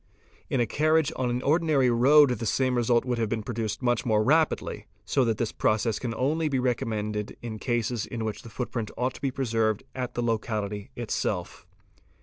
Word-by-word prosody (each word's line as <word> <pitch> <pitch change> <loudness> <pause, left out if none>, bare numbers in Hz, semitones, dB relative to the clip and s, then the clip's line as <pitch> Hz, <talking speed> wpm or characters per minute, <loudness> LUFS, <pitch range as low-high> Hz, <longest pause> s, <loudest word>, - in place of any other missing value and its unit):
In 130 - 0
_ - - +3
acarriage 155 +4 +2
on 130 -1 -1
an 120 +1 -2
ordinary 150 -4 +3
road 135 +4 +6
the 115 -1 -2
same 130 +3 +1
result 120 0 +2
would 125 -2 -1
have 110 -2 0
been 110 -1 -2
produced 110 -1 -3
"much 120 -2 +1
more 110 -2 +2
rapidly, 155 +6 +1 0.2
so 135 - +2
that 115 -2 0
this 115 -1 -1
process 110 0 +1
can 120 -3 -3
only 155 +5 0
be 135 - 0
recommended 105 -4 -2
in 110 -2 -5
the 120 - -4
'eases 120 -1 0
in 115 -2 -4
which 110 -1 -4
the 120 - -11
footprint 115 -2 -4
ought 125 +2 0
to - - -12
be 135 - +1
preserved 115 -5 0
at 125 -2 -4
the 120 - -1
locality 105 -3 -2
itself. - - -3
120 Hz, 195 wpm, -27 LUFS, 110-130 Hz, 0.2 s, road